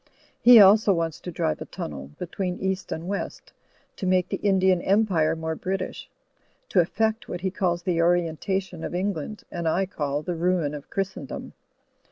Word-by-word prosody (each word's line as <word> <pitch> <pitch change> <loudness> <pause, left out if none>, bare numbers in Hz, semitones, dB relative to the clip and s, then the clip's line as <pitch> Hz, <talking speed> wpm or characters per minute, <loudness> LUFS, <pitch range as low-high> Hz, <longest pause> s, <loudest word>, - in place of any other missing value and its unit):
He 240 -1 +9
also 205 0 +7
wants 165 -2 -2
to 180 - -7
drive 80 - -1
a - - -4
tunnel 70 -2 -6
— - - -40
^between 180 +1 -3
East 190 0 -2
and 165 +2 -4
West 200 +1 -5 0.2
— - - -38
^to 190 - -3
make 185 -1 +2
the - - -2
Indian 190 -3 +3
Empire 190 -6 +2
more 160 0 -3
British; 185 +3 -4 0.6
to 190 - +3
eflfect 220 +6 0
what 175 - -5
he 190 0 -1
calls 175 -3 -1
the 175 -2 +1
orientation 175 +1 0
of - - -4
Eng 195 +3 0
land, 180 +6 -7
and 170 -1 -3
I 185 +4 +2
call 145 -5 -3
the 175 - -2
ruin 170 -3 0
of 145 -1 -8
Christendom. 195 -8 -4
180 Hz, 185 wpm, -25 LUFS, 165-195 Hz, 0.6 s, He